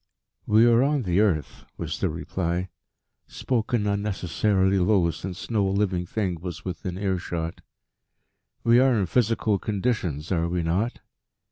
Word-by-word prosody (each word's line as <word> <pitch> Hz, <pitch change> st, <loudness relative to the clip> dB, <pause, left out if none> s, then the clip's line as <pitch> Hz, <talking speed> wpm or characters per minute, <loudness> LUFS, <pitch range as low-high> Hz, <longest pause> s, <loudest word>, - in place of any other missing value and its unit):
"We 110 Hz, +2 st, +5 dB
are 120 Hz, 0 st, +5 dB
on 140 Hz, 0 st, +1 dB
the 90 Hz, -1 st, +1 dB
earth," 95 Hz, -8 st, 0 dB
was -, -, -4 dB
the -, -, +1 dB
reply, 85 Hz, +2 st, -3 dB, 0.6 s
spoken 120 Hz, -3 st, -1 dB
unnecessarily 100 Hz, -1 st, +1 dB
low 90 Hz, -2 st, +3 dB
since 90 Hz, +7 st, -7 dB
no 105 Hz, -3 st, +2 dB
living 95 Hz, -3 st, 0 dB
thing 95 Hz, -4 st, -2 dB
was 85 Hz, -2 st, -7 dB
within 90 Hz, 0 st, -4 dB
earshot, 85 Hz, -4 st, -3 dB, 1.0 s
"we 120 Hz, +1 st, +5 dB
are 130 Hz, -3 st, +4 dB
in 95 Hz, -, +1 dB
physical 110 Hz, -1 st, +1 dB
conditions, 95 Hz, -, -2 dB
are 85 Hz, -2 st, +1 dB
we 90 Hz, -1 st, -1 dB
not? 95 Hz, +9 st, -1 dB
95 Hz, 135 wpm, -25 LUFS, 85-110 Hz, 1.0 s, We